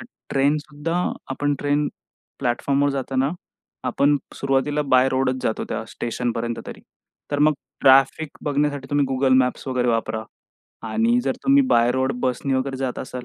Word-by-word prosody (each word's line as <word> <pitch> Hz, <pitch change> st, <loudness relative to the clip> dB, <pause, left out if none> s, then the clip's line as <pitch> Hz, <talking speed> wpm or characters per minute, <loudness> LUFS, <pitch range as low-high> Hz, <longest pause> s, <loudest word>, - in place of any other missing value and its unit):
तर -, -, -9 dB, 0.3 s
ट्रेनसुद्धा 150 Hz, +3 st, 0 dB, 0.3 s
आपण 145 Hz, +2 st, 0 dB
ट्रेन 145 Hz, +1 st, +1 dB, 0.5 s
प्लॅटफॉर्मवर 140 Hz, +3 st, +1 dB
जाताना, 135 Hz, 0 st, -1 dB, 0.5 s
आपण 145 Hz, +1 st, +2 dB, 0.2 s
सुरुवातीला 135 Hz, +2 st, 0 dB
बाय 130 Hz, -2 st, +4 dB
रोडच 130 Hz, 0 st, +1 dB
जातो, 110 Hz, -, -1 dB
त्या -, -, -3 dB
स्टेशनपर्यंत 120 Hz, 0 st, -3 dB
तरी. -, -, -8 dB, 0.5 s
तर 145 Hz, -, 0 dB
मग 150 Hz, +1 st, +5 dB, 0.3 s
ट्रॅफिक 135 Hz, +3 st, +5 dB, 0.2 s
बघण्यासाठी 145 Hz, -1 st, 0 dB
तुम्ही 145 Hz, 0 st, +2 dB
Google 130 Hz, 0 st, +3 dB
मॅप्स 125 Hz, +1 st, 0 dB
वगैरे 125 Hz, -1 st, 0 dB
वापरा. 110 Hz, -1 st, 0 dB, 0.7 s
आणि 235 Hz, -, +2 dB
जर -, -, +1 dB
तुम्ही 275 Hz, +1 st, +5 dB
बाय 120 Hz, +1 st, +4 dB
रोड, 130 Hz, +1 st, 0 dB
बसने 130 Hz, +1 st, 0 dB
वगैरे 130 Hz, +1 st, -1 dB
जात 130 Hz, -1 st, -3 dB
असाल 125 Hz, -1 st, -6 dB
135 Hz, 145 wpm, -22 LUFS, 130-145 Hz, 0.7 s, मग